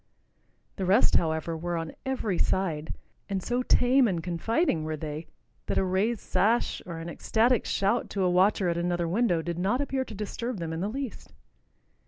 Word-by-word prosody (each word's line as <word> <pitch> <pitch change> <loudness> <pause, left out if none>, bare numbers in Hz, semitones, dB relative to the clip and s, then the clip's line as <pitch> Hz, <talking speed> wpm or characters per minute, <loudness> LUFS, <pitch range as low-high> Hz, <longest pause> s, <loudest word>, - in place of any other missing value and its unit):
The 190 - -1
rest, 200 +7 +4
however, 160 0 -1
were 170 +1 -3
on 165 -1 -4
every 220 -9 -1
side, 160 -5 0 0.3
and 195 -2 -2
so 245 +1 0
tame 250 +1 +4
and 175 -5 -1
confiding 180 - 0
were 155 0 -3
they 155 +1 -5 0.4
that - - 0
a - - +3
raised 195 +5 0
sash, 215 +6 +1
or 170 -2 -5
an 165 +1 -6
ecstatic 225 +7 +1
shout 200 +5 +1
to 195 - -1
a 180 - +3
watcher 185 +1 +3
at 170 -1 0
another 175 0 0
window 180 -3 +1
did 170 0 -3
not 200 +8 +1
appear 270 -2 -1
to 220 - -9
disturb 225 +3 -4
them 165 -2 -4
in 160 - -3
the 200 - -1
least. 265 -1 -6
190 Hz, 185 wpm, -28 LUFS, 170-230 Hz, 0.4 s, rest